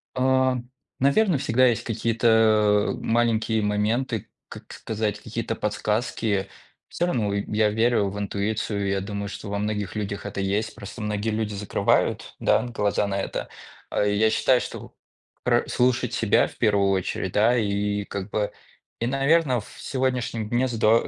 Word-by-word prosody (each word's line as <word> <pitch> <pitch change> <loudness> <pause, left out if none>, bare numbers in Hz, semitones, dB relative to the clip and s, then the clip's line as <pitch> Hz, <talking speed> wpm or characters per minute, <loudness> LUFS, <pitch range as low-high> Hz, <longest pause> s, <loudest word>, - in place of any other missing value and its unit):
Ам, 130 -1 +1 0.3
наверно, 155 +6 +3
всегда 130 0 +3
есть 120 -3 +1
какие-то, 115 +1 0
а, 110 -2 +4
маленькие 115 -1 +1
моменты, 105 +3 -1 0.2
как - - -11
сказать, 105 -1 -3
какие-то 115 +1 -3
подсказки. 105 -1 -1 0.4
Всё 175 - -1
равно, 115 -12 0
и 100 0 -1
я 110 0 +4
верю 110 -1 +2
в 100 - -7
интуицию, 100 0 -2
я 95 0 0
думаю, 100 +1 -4
что 105 - -7
во 100 0 -2
многих 105 -1 -2
людях 100 -1 -4
это 100 -1 -5
есть, 100 +3 -1
просто 105 +3 -9
многие 105 +1 -2
люди 110 -1 -2
закрывают, 100 0 0
да, - - +3
глаза 105 -4 0
на 100 0 -2
это. - - -4 0.4
А - - 0
я 105 +2 +3
считаю, 125 +3 +3
что - - -8 0.5
про - - +2
слушать 125 0 +1
себя - - +3
в - - -14
1 100 -2 +3
очередь, 95 -1 -1
да, 115 +4 +4
и 105 -1 0
как 100 0 -5
бы 105 0 -1 0.5
и 115 - -1
наверно, 135 +1 +2
ф 110 - -6
в - - -14
сегодняшнем 125 -4 -2
дне 120 +3 +1
здо 115 -1 +3
110 Hz, 160 wpm, -24 LUFS, 105-120 Hz, 0.5 s, а